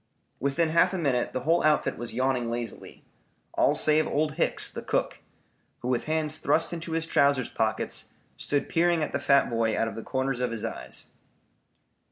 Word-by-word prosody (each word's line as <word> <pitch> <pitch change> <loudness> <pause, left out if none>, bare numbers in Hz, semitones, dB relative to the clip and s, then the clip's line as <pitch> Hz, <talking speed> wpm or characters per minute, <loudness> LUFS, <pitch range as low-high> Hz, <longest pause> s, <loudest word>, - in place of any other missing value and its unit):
Within 140 +5 +1
half 175 +4 +3
a - - -1
minute 135 -7 0
the 130 - -3
whole 165 +5 +2
outfit 155 0 +2
was 120 0 -6
yawning 130 -2 0
lazily, 120 0 -6 0.5
all - - +3
save 155 0 +3
Old 150 +1 0
Hicks, 160 +3 0
the - - -6
cook, - - -1 0.6
who 125 - -3
with 125 -2 0
hands 155 0 0
thrust 165 - +2
into 165 -1 -5
his 165 0 0
trousers 140 -5 +2
pockets 110 -1 -1 0.3
stood 145 -1 -1
peering 170 -1 +2
at - - -3
the - - -1
fat 140 0 +4
boy 115 -1 0
out 115 - +1
of 110 - -5
the 115 - -6
corners 130 +1 -2
of 125 -1 0
his 115 -2 -4
eyes. - - -5
140 Hz, 185 wpm, -27 LUFS, 120-160 Hz, 0.6 s, fat